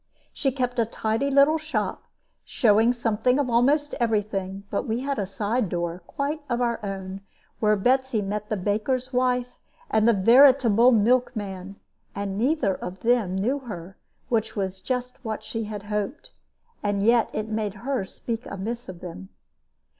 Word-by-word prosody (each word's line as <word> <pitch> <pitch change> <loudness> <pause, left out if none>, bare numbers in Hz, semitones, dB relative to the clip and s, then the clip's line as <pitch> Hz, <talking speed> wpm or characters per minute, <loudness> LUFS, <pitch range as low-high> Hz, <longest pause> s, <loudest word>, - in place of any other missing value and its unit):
She 275 -2 0
kept 250 -1 -2
a 230 - +3
tidy 225 +4 -1
little 280 +3 +5
shop, 310 +1 -3 0.4
showing 225 0 +3
something 235 +1 +1
of 275 -4 0
almost 285 +5 +3
every 225 -3 +2
thing; 195 -1 -5
but 200 - -1
we 230 +2 -1
had 275 -2 -2
a 195 - -1
side 210 +2 -1
door, 175 0 -3
quite 290 +2 -3
of 240 -1 0
our 235 -2 -1
own, 195 -1 -5 0.4
where 215 -1 +3
Betsy 255 +3 +2
met 210 +1 -3
the 215 - 0
baker's 230 +7 -1
wife 250 0 0 0.3
and 220 0 +3
the 235 - +6
veritable 240 +2 +6
milkman; 210 -5 +1 0.4
and 200 -1 -3
neither 240 -2 +1
of 185 0 -7
them 230 -6 +2
knew 240 +9 0
her, 195 -7 -8 0.3
which 225 -2 0
was 190 -2 -3
just 250 +4 -4
what 220 -2 -4
she 225 0 -4
had 210 -1 -6
hoped; 210 +6 -4 0.5
and 205 -1 0
yet 235 0 +4
it 215 0 -3
made 215 -2 -2
her 270 -6 0
speak 225 +4 -5
amiss 225 +5 -5
of 175 -2 -9
them. 185 +2 -8
220 Hz, 160 wpm, -25 LUFS, 200-250 Hz, 0.5 s, the